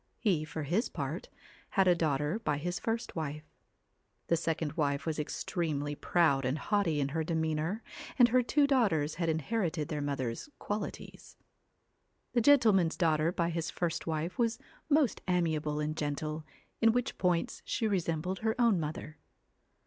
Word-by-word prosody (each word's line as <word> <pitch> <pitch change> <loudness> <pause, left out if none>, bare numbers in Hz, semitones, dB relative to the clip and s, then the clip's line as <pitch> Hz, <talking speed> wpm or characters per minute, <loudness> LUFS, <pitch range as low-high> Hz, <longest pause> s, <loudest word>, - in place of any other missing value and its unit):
He, 185 -9 +1
for 155 0 -5
his 180 - 0
part, - - -4 0.5
had 190 -1 +5
a 180 - +7
daughter 155 +2 0
by 150 -10 -1
his 175 +4 -3
first 230 +1 -3
wife. 150 -2 -3 0.9
The 170 - +5
second 160 -2 -1
wife 145 -3 0
was 160 -2 -2
extremely 150 -1 -2
proud 145 -3 +2
and 130 +4 0
haughty 175 -3 +1
in 140 -1 0
her 160 +3 -1
demeanour, 160 +5 -1 0.3
and 245 -1 +7
her 250 +2 +4
two 285 +4 +3
daughters 200 - +2
had 165 - +1
inherited 160 -1 -1
their 150 -2 -2
mother's 135 - -3
qualities. 205 0 -6 1.0
The 240 - +3
gentleman's 220 - +5
daughter 160 -1 +2
by 170 -1 0
his 165 0 -2
first 165 -2 -2
wife 160 +4 -2
was 230 -1 +2 0.3
most 285 -7 +3
amiable 160 -4 0
and 150 +1 -1
gentle, 155 +1 -3 0.4
in 225 -1 +5
which 245 +1 -1
points 180 -2 0
she 225 - -1
resembled 180 -2 -1
her 220 +3 -1
own 230 -6 +4
mother. 155 0 -5
165 Hz, 155 wpm, -31 LUFS, 150-205 Hz, 1.0 s, a